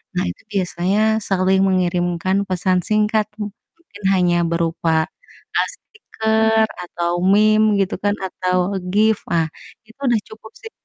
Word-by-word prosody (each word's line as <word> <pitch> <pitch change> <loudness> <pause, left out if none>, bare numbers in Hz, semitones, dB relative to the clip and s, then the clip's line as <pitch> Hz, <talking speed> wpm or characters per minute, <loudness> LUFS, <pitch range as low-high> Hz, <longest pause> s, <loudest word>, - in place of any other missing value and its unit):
Nah, - - +1
itu 90 - -8
biasanya 190 0 0 0.3
saling 190 0 +2
mengirimkan 180 0 0
pesan 185 0 +1
singkat, 215 0 +2
m 210 -1 -4 0.3
mungkin 210 -12 -16
hanya 180 -2 +2 0.2
berupa, 165 0 -1 0.7
ah, - - +2
stiker 220 - 0 0.2
atau 175 0 -3 0.2
meme 215 +1 +4
gitu 195 +1 0
kan, 205 0 +2
atau 185 0 -1 0.3
GIF, 215 +2 +3
ah, 165 -1 +2 0.4
itu 225 +5 -20
udah 235 -3 +3
cukup 220 0 -13
sih 450 - -9
195 Hz, 135 wpm, -20 LUFS, 180-215 Hz, 0.7 s, meme